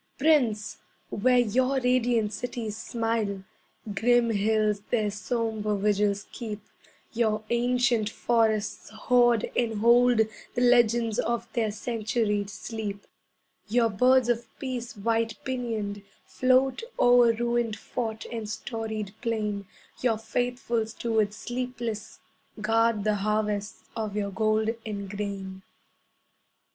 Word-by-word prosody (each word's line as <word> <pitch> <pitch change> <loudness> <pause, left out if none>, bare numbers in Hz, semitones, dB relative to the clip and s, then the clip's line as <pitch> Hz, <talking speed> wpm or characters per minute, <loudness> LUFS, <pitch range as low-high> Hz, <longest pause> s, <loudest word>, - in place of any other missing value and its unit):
Prince, 260 -8 +2 0.3
where 250 +4 +3
your 255 +3 +2
radiant 245 -4 +2
cities 225 -1 -4
smile, 225 -4 -2 0.5
Grim 235 +3 +3
hills 210 0 +1
their 215 -4 +1
sombre 215 0 -2
vigils 205 0 +1
keep, 215 -4 -5 0.5
Your 220 -2 +1
ancient 240 -2 +2
forests 220 -2 0
hoard 240 +1 +2
and 230 -2 +1
hold 240 +1 +5 0.3
The 245 - 0
legends 235 -2 +4
of 235 0 -1
their 225 -3 +1
centuried 210 -1 -1
sleep; 210 -2 -6 0.6
Your 230 +1 +3
birds 250 +4 +4
of 235 -1 0
peace 245 -4 -5
white 225 +1 0
pinioned 225 -6 -3 0.2
float 255 0 +2 0.2
O'er 245 -1 +6
ruined 235 -1 0
fort 220 0 -4
and 225 -3 -4
storied 220 -2 -4
plain, 210 -4 -2 0.3
Your 235 -3 +2
faithful 240 +1 -1
stewards 220 -2 -1
sleepless 240 -2 -5 0.4
guard 225 0 +2
The 210 0 +1
harvests 210 0 -1
of 215 -3 -3
your 200 -1 -1
gold 215 +2 +1
and 200 -2 -5
grain. 195 -1 -5
225 Hz, 110 wpm, -27 LUFS, 210-240 Hz, 0.6 s, O'er